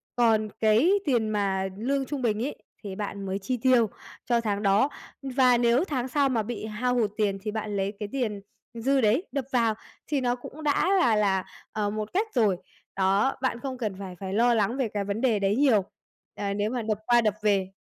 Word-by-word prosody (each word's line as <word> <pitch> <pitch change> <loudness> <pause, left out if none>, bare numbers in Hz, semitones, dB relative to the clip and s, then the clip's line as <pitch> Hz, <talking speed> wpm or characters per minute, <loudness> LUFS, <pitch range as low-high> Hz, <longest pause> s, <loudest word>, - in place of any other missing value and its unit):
Còn 220 -3 +3
cái 220 - +4
tiền 240 -7 +1
mà 195 -2 0
lương 270 +5 -1
trung 285 0 -4
bình 220 -2 0
ấy, 290 - -4 0.3
thì 195 -2 -6
bạn 200 -1 -5
mới 190 +1 -2
chi 250 +6 -2
tiêu 240 -2 +3 0.4
cho 235 -1 +2
tháng 205 -2 -2
đó. 200 +7 +3 0.3
Và 260 -2 +3
nếu 240 +4 +3
tháng 260 -7 -2
sau 275 +1 +2
mà 230 -4 0
bị 220 0 -5
hao 240 +4 -1
hụt 220 -4 +1
tiền 205 -3 +1
thì 210 +1 -3
bạn 215 -1 -4
lấy 195 +1 -1
cái 210 -2 -4
tiền 220 -7 -2 0.3
dư 265 +4 +1
đấy 230 - +3
đập 275 -3 -2
vào 230 -3 +2 0.3
thì 290 -3 0
nó 245 -1 +1
cũng 280 +5 -10
đã 295 +5 +2
là 235 -11 +4
là, 195 -3 +1 0.3
ờ, 210 -1 -1
một 215 0 -4
cách 410 +5 +1
rồi. 210 -7 +3 0.4
Đó, 195 +7 +2
bạn 255 -3 -1
không 260 +1 -5
cần 215 -6 -3
phải 190 -2 -7
phải 190 -1 -5
lo 235 +3 +4
lắng 225 +2 +1
về 260 -4 +1
cái 205 -1 -1
vấn 200 +3 -3
đề 235 -5 +2
đấy 200 +1 +1
nhiều, 245 -7 +4 0.5
ờ, 200 -1 -2
nếu 205 +1 -1
mà 245 +1 -2
đập 215 -1 -1
qua 240 0 +5
đập 215 -3 +1
về. 200 -3 +2
220 Hz, 220 wpm, -26 LUFS, 205-255 Hz, 0.5 s, qua